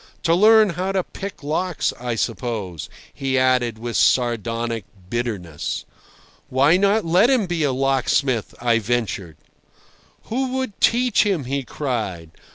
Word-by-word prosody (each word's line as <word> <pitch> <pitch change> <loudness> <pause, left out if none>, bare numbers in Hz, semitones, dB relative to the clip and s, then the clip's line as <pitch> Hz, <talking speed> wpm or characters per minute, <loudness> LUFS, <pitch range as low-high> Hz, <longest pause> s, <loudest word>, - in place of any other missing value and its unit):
"To 165 - +3
learn 215 +2 +6
how 185 +3 -2
to 190 -2 +1
pick 195 -4 -8
locks, 155 +2 -1
I 120 -1 -2
suppose," 105 - -3 0.2
he 135 -1 -1
added 125 -3 +2
with 120 +1 -5
sardonic 115 -2 +1 0.3
bitterness. 105 -11 -3 0.6
"Why 140 +6 +4
not 200 +2 +2
let 180 +8 +4
him 255 -6 +3
be 175 -2 -2
a 145 -3 +2
locksmith?" 135 -2 0
I 115 -1 +2
ventured. 105 -7 -2 0.9
"Who 255 +2 -2
would 260 -6 -3
teach 245 +1 +3
him?" 195 -8 0
he 140 +2 -2
cried. 110 - -4
130 Hz, 135 wpm, -22 LUFS, 115-185 Hz, 0.9 s, learn